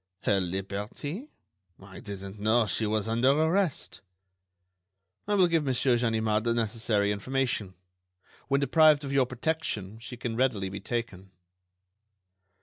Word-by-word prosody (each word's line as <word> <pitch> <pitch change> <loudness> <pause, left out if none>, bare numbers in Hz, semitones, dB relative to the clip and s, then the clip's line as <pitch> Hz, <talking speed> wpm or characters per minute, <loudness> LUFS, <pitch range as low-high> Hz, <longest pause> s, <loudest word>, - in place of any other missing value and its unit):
"Her 100 - +2
liberty?... 100 - -4 0.5
I 95 -1 -12
didn't 100 0 -8
know 110 +3 +3
she 110 +1 0
was 110 0 0
under 115 +3 +2
arrest." 160 +2 0 1.3
"I 205 - +1
will 185 -3 +5
give 165 -2 +1
Monsieur 130 -2 +2
Ganimard 110 -2 +1
the 115 0 +1
necessary 110 -2 0
information. 110 -3 -2 0.7
When 140 0 +2
deprived 150 +1 +5
of 140 -1 -4
your 135 -2 +3
protection, 125 -7 -3
she 120 +2 -9
can 115 -1 -4
readily 115 -6 0
be 100 +1 -6
taken." 100 -4 -4
115 Hz, 130 wpm, -28 LUFS, 105-135 Hz, 1.3 s, will